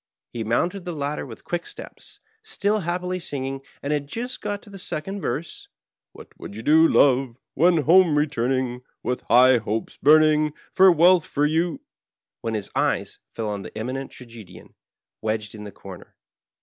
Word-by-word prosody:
He 115 - -3
mounted 175 - 0
the 175 -1 -5
ladder 145 -1 -3
with 115 - -11
quick 175 -1 -3
steps, - - -11 0.2
still 215 - -1
happily 180 +1 -2
singing, 135 -5 -4 0.2
and 145 +2 -1
had 145 -1 -2
just 240 - -5
got 205 0 -4
to 205 - -15
the 195 - -9
second 195 +4 -4
verse 155 +5 -4 0.2
— - - -69
What - - -13
would 100 - -9
you 110 - -7
do, 160 +4 +6
love, 130 -5 +3 0.2
when 170 +1 +3
home 170 0 +5
returning, 130 -3 0 0.2
With 125 - -2
hopes 120 -3 +3
high - - -31
burning, 155 0 +5 0.3
with 185 -3 +7
wealth 175 +1 +5
for 145 0 0
you 165 - 0 0.3
— - - -69
when 115 -2 -2
his 105 -2 -4
eye - - +1 0.3
fell 110 -1 -3
on 100 -1 -4
the - - -10
Eminent 130 +4 -4
Tragedian 110 -8 -13 0.5
wedged 110 -1 -2
in 105 -1 -9
the 105 - -8
comer. 95 -2 -12
145 Hz, 175 wpm, -23 LUFS, 120-175 Hz, 0.5 s, with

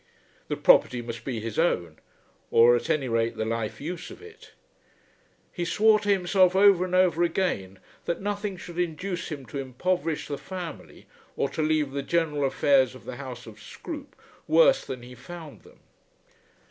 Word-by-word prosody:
The - - -2
property 125 - +5
must 115 -1 -7
be 125 -4 -3
his 110 +3 -4
own, 85 - 0 0.5
or 120 +1 +6
at 120 - -3
any 155 -5 +1
rate 115 -1 0
the 110 - -1
life 115 -1 -3
use 175 +4 -6
of - - -11
it. 440 +1 -15 1.0
He 175 - -4
swore 215 +6 +4
to 205 0 -4
himself 185 -1 +3
over 195 -2 +6
and 185 0 -2
over 180 -2 +3
again 165 - -1 0.3
that 170 - -2
nothing 205 -1 -3
should 175 0 -8
induce 180 +2 -3
him 145 -4 -6
to 125 +4 -6
impoverish 160 +5 -2
the 145 - -4
family 180 -4 -8 0.3
or - - 0
to - - -3
leave 155 -2 +1
the 140 +1 -3
general 150 -2 0
affairs 135 -1 +3
of 130 - -14
the 125 - -7
house 125 -3 -8
of 105 -2 -13
Scroope 285 - -9 0.3
worse - - +5
than 125 -2 -7
he 125 +1 -11
found 160 +4 -10
them. - - -20
160 Hz, 170 wpm, -26 LUFS, 125-185 Hz, 1.0 s, or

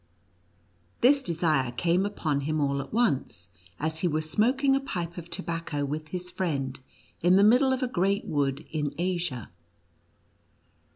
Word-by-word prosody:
This 275 +3 +5
desire 155 - +1
came 175 +8 +1
upon 155 -8 -1
him 155 +2 -1
all 140 -1 +1
at 135 - -10
once, 140 - 0 0.3
as 160 +1 -1
he 180 - +1
was 155 -1 0
smoking 265 - +2
a - - +2
pipe 175 -10 -4
of 175 -1 -8
tobacco 165 -4 -3
with 155 +2 -4
his 180 +2 -5
friend 140 -7 -2 0.4
in 180 +2 +5
the 195 - +6
middle 250 +5 +5
of 260 0 0
a - - +1
great 195 -2 0
wood 140 -2 -1
in 150 -2 -2
Asia. 175 - -2
170 Hz, 155 wpm, -27 LUFS, 145-195 Hz, 0.4 s, the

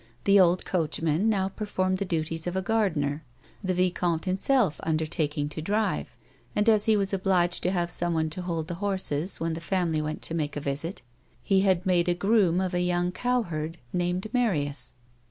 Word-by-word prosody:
The 200 0 +5
old 180 -1 +4
coachman 165 +2 0
now 195 -3 +1
performed 185 -2 -2
the 200 - -1
duties 165 -1 -2
of 175 - -3
a 190 - 0
gardener, 160 -9 0 0.4
the 185 -1 0
vicomte 175 -2 0
himself 195 - +1
undertaking 155 -2 -1
to 150 - -6
drive, 210 +6 -1 0.4
and 210 +2 +1
as 215 -2 +5
he 220 -1 +4
was 195 0 0
obliged 185 -2 +1
to 180 - +1
have 175 -2 -1
someone 165 -2 0
to 180 - -5
hold 165 -3 -3
the 175 - -4
horses 190 -4 +1
when 165 0 -1
the 165 - -5
family 170 -3 0
went 155 0 -4
to - - -2
make 150 -3 -2
a - - -1
visit, 145 +5 -3 0.4
he 195 - +3
had 190 -2 +2
made 180 -2 +2
a 175 - +2
groom 195 -2 +3
of 185 -1 -1
a 175 - +1
young 180 0 0
cowherd 180 -8 -2 0.2
named 180 +1 -1
Marina. 180 - +1
180 Hz, 185 wpm, -27 LUFS, 160-195 Hz, 0.4 s, The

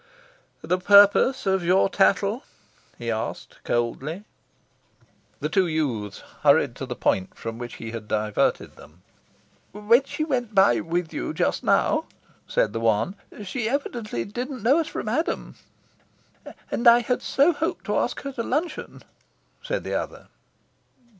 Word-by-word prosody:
"The 180 +3 0
purpose 205 +7 +5
of 190 -2 +1
your 185 +3 +4
tattle?" 200 +4 +2 0.5
he 120 -1 -3
asked 110 0 -5
coldly. 135 - -2 1.2
The 150 - 0
two 180 +3 +2
youths 125 -11 -2 0.2
hurried - - +4
to - - -5
the - - -4
point 95 - 0
from 115 0 -6
which 120 0 -7
he 115 0 -7
had 115 -2 -7
diverted 105 -1 -1
them. 85 +4 -17 0.7
"When 215 +5 +3
she 310 - -3
went 245 -8 -2
by 155 -12 +5
with 165 0 -3
you - - -4
just - - 0
now," - - +2 0.4
said 105 - +1
the 115 - -2
one, 115 - +1 0.3
"she 220 +3 -3
evidently 235 - -3
didn't 245 +3 -6
know 270 +8 +4
us 320 - -1
from - - -5
Adam." 285 +10 -2 1.2
"And 235 - +1
I 235 +1 +8
had 245 +2 -1
so 285 +6 +3
hoped 320 +2 -3
to - - 0
ask - - -2
her 275 - -5
to 260 -3 -4
luncheon," 305 +7 -3 0.6
said - - -3
the - - -4
other. - - -4
195 Hz, 145 wpm, -24 LUFS, -, 1.2 s, I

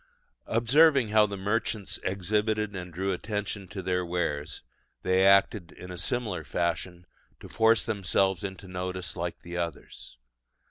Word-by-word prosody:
Observing 130 +2 +4
how 105 0 +5
the 100 -1 -5
merchants 105 +1 -1
exhibited 105 +2 0
and 90 -1 -6
drew 95 +3 -1
attention 100 0 -4
to 95 +1 -7
their 90 0 0
wares, 80 -4 -3 0.4
they 95 +1 +3
acted 100 -1 +4
in 90 - -10
a 90 - -7
similar 105 -5 -2
fashion 85 +3 -2 0.3
to - - -10
force 115 0 +3
themselves 95 -3 0
into 95 0 -6
notice 90 0 -4
like 85 -1 -4
the 85 0 -7
others. 85 -7 -6
95 Hz, 140 wpm, -28 LUFS, 90-105 Hz, 0.4 s, how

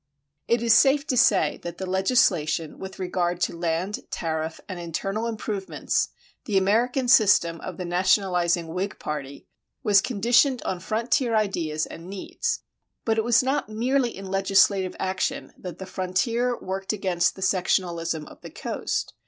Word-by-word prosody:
It 235 0 +2
is 230 -1 +5
safe 275 +5 +5
to 270 - -1
say 225 -6 +3
that 175 0 -7
the 190 - -4
legislation 185 -5 +1
with 190 0 -8
regard 180 -1 -1
to - - 0
land, 170 +4 -2
tariff, 160 -1 -3
and 185 -3 -6
internal 195 +6 -3
improvements 210 -3 -2 0.4
the 210 -5 +1
American 235 +7 +2
system 190 -8 +4
of 185 - -7
the 180 - -4
nationalizing 175 -2 +2
Whig 185 +4 -3
party 140 -2 -6 0.4
was 200 -2 +5
conditioned 245 +3 +2
on 185 - -2
frontier 230 +4 0
ideas 170 -8 0
and 170 +2 -10
needs. 460 - -3 0.4
But 225 -1 +2
it - - +1
was 235 +1 +4
not 270 -1 -1
merely 240 +2 0
in 195 - -8
legislative 195 0 +2
action 230 +9 -2
that 180 -3 -8
the 190 - -7
frontier 230 +7 -1
worked 190 +2 -3
against 185 -4 0
the 190 - -6
sectionalism 170 -4 0
of - - -15
the - - -9
coast. - - -3
190 Hz, 155 wpm, -25 LUFS, 175-230 Hz, 0.4 s, is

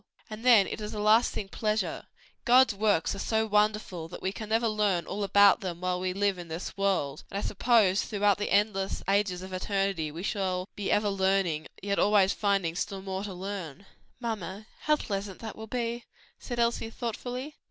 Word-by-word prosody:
"And 215 +1 -7
then 235 -6 +7
it 220 - -5
is 210 0 -5
a - - -3
lasting 215 -1 +3
pleasure. 215 +1 -2 0.4
God's 255 -1 +5
works 200 -4 +1
are 195 - -6
so 220 +1 +1
wonderful 210 -5 0
that 170 - -9
we 190 - 0
can 215 +1 -7
never 225 +1 +2
learn 205 -6 +1
all 205 +1 -3
about 200 0 +6
them 175 -3 -4
while 180 0 -1
we 185 0 -1
live 195 0 0
in 175 - -8
this 165 +2 -6
world, 190 -8 0
and 195 - -5
I - - -1
suppose 210 -2 +3
throughout 205 -1 +1
the 205 - -2
endless 200 -1 +1
ages 195 -2 +1
of 190 0 -8
eternity, 195 -4 -1
we 165 +4 -7
shall 185 -2 -1
be 205 - -3
ever 205 0 +2
learning, 190 -5 +1 0.2
yet 200 0 0
always 200 -2 +4
finding 195 -5 0
still 195 0 -3
more 190 0 -4
to 200 - -6
learn." 190 -2 -6 0.3
"Mamma, 215 -3 -4
how 305 - +3
pleasant 200 -7 -4
that 220 -2 -6
will 220 0 -8
be," 235 0 -3 0.3
said 240 - -6
Elsie 235 -1 0
thoughtfully. 245 +5 -5
200 Hz, 190 wpm, -28 LUFS, 190-215 Hz, 0.4 s, then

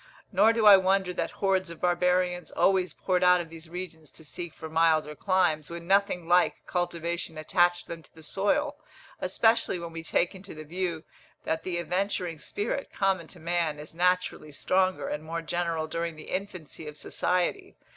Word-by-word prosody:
Nor 205 +3 +5
do 225 -1 +1
I 205 -2 +11
wonder 190 -1 +1
that - - -2
hordes 190 -2 0
of 170 - -9
barbarians 180 0 +1
always 190 -2 +2
poured 180 -1 0
out 180 0 +6
of 165 -2 -6
these 165 0 -10
regions 170 -3 -7
to 160 - -13
seek 170 +2 -6
for 160 - -7
milder 160 -1 +2
climes, 160 -3 +1
when 170 0 -7
nothing 195 -2 +2
like 175 +1 +3
cultivation 170 -2 -3
attached 175 +2 +2
them 165 -1 -7
to - - -21
the 160 - -14
soil, 285 - 0 0.4
especially 225 -4 +2
when 170 -1 -6
we 165 0 -6
take 170 +3 0
into 190 -2 -11
the 155 - -8
view 170 0 -3 0.4
that 160 0 -1
the 180 -2 -3
adventuring 180 -1 -1
spirit, 220 - -3
common 190 -4 0
to 180 - -12
man, 165 -2 0
is 150 +1 -9
naturally 180 -3 0
stronger 185 +5 +1
and 150 - -4
more 165 +1 -4
general 170 -2 -1
during 165 +1 -3
the 155 - -10
infancy 185 -5 -5
of 150 0 -7
society. 185 - -1
175 Hz, 175 wpm, -28 LUFS, 165-185 Hz, 0.4 s, I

